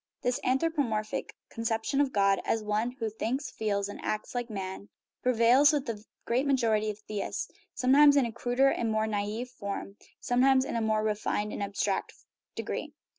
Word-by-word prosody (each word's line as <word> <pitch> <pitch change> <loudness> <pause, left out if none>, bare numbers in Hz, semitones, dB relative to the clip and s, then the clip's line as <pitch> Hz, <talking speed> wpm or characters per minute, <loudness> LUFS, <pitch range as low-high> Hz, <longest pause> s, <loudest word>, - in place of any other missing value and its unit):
This 245 0 +1
anthropomorphic 260 -6 -1 0.2
conception 230 +4 0
of 280 -2 +1
God 195 -3 +3
as 225 -1 0
one 210 +3 0
who 230 -3 -3
thinks, 235 +6 -3
feels, 200 -2 -1
and 205 - -8
acts 215 - -3
like 245 -1 -3
man 195 -1 -6 0.3
prevails 250 +4 +5
with 290 -3 -1
the 215 -3 -5 0.2
great 255 +4 +1
majority 225 -6 +2
of 210 - -4
theists, 210 -1 -4 0.2
sometimes 285 +3 +6
in 275 - +4
a 235 - -3
cruder 245 +4 +2
and 230 -4 -1
more 215 0 +1
naive 215 +3 -2
form, 200 -3 -6 0.2
sometimes 260 +2 +3
in - - -4
a 230 - 0
more 215 -1 +1
refined 210 0 -1
and - - -4
abstract 200 0 -1 0.4
degree. - - -4
225 Hz, 170 wpm, -29 LUFS, 210-255 Hz, 0.4 s, sometimes